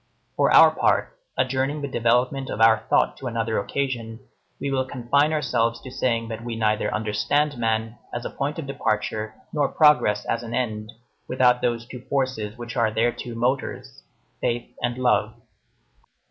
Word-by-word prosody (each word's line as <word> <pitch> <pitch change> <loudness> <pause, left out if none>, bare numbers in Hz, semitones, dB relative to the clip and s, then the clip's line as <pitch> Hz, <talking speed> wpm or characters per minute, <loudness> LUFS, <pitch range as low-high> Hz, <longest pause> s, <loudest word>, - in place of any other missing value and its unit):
For - - +3
our - - +8
part, - - +1 0.2
adjourning 135 +3 0
the - - -1
development 125 +2 +1
of 105 - -4
our 115 0 +5
thought - - +2
to 130 - -6
another 115 -2 -1
occasion, 120 -5 -3 0.4
we 140 - -2
will 130 -1 +1
confine 130 +4 +1
ourselves 120 -6 0
to 130 - -9
saying 115 -3 0
that 115 0 -6
we 120 -1 -4
neither 110 -1 +1
understand 145 +8 0
man 115 0 -1
as 120 0 -5
a - - -4
point 145 +2 -3
of 165 - -4
departure 110 -4 -2 0.2
nor 145 -3 +2
progress 140 -9 +3
as 115 - -1
an 120 0 -5
end, 110 -3 -2 0.4
without 125 -1 +3
those 120 -1 -1
two 125 0 -9
forces 130 -6 -1
which 120 0 -7
are 115 -3 +2
their 115 +3 +1
two 120 -1 -7
motors: 125 +3 -2 0.4
faith 120 0 -2
and 120 0 -1
love. 130 -1 +1
120 Hz, 165 wpm, -24 LUFS, 115-130 Hz, 0.4 s, our